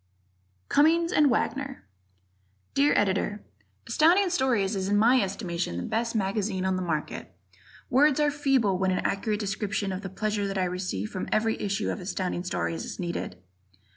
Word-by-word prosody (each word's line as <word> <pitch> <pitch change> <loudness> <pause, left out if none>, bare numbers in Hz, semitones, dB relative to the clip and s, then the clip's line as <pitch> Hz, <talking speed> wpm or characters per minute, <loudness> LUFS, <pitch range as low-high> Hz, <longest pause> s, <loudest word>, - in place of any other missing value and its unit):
Cummings 330 +3 +3
and 295 -1 +5
Wagner 270 +3 -2 0.9
Dear 145 +2 +3
Editor: 205 +1 0 0.4
Astounding 345 +9 +4
Stories 235 - +1
is 190 -1 -2
in 205 - +3
my 240 +4 +5
estimation 180 - -3
the 90 - -3
best 230 - -2
magazine 195 -2 -1
on 190 0 +1
the 185 - -2
market. 155 - -3 0.6
Words 285 +3 +4
are 295 -1 +3
feeble 270 -10 +1
when 190 0 +1
an 185 - -1
accurate 210 +1 -1
description 200 0 -2
of 185 +1 -4
the 195 - -6
pleasure 210 +1 -2
that 195 0 -3
I 190 - +1
receive 180 - -3
from 185 - -4
every 225 +1 +1
issue 205 +1 -1
of - - -4
Astounding 180 -1 -3
Stories 165 -2 -2
is - - -7
needed. 170 - -4
205 Hz, 165 wpm, -27 LUFS, 185-240 Hz, 0.9 s, and